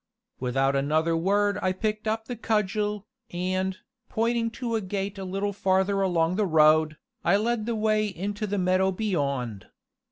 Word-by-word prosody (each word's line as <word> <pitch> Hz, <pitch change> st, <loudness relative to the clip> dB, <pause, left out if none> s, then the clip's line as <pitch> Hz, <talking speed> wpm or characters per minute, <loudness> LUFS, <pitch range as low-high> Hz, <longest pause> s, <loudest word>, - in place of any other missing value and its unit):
Without 135 Hz, +2 st, +1 dB
another 155 Hz, +4 st, +1 dB
word 200 Hz, +4 st, +1 dB
I 185 Hz, 0 st, +1 dB
picked 215 Hz, +2 st, -2 dB
up 220 Hz, +1 st, -1 dB
the 245 Hz, -, -5 dB
cudgel, 210 Hz, -2 st, -1 dB, 0.2 s
and, 185 Hz, +1 st, -2 dB, 0.3 s
pointing 230 Hz, +1 st, 0 dB
to 240 Hz, -3 st, -3 dB
a 225 Hz, -, +1 dB
gate 195 Hz, +1 st, -4 dB
a -, -, -4 dB
little 195 Hz, +2 st, -2 dB
farther 190 Hz, +1 st, +1 dB
along 175 Hz, -1 st, +1 dB
the 210 Hz, -2 st, +2 dB
road, 155 Hz, -1 st, +4 dB, 0.3 s
I 175 Hz, +4 st, +4 dB
led 225 Hz, +1 st, -1 dB
the 235 Hz, -, 0 dB
way 215 Hz, 0 st, +1 dB
into 205 Hz, +3 st, -4 dB
the 205 Hz, +1 st, -2 dB
meadow 185 Hz, +1 st, +2 dB
beyond. 140 Hz, -, -2 dB
195 Hz, 160 wpm, -26 LUFS, 170-215 Hz, 0.3 s, road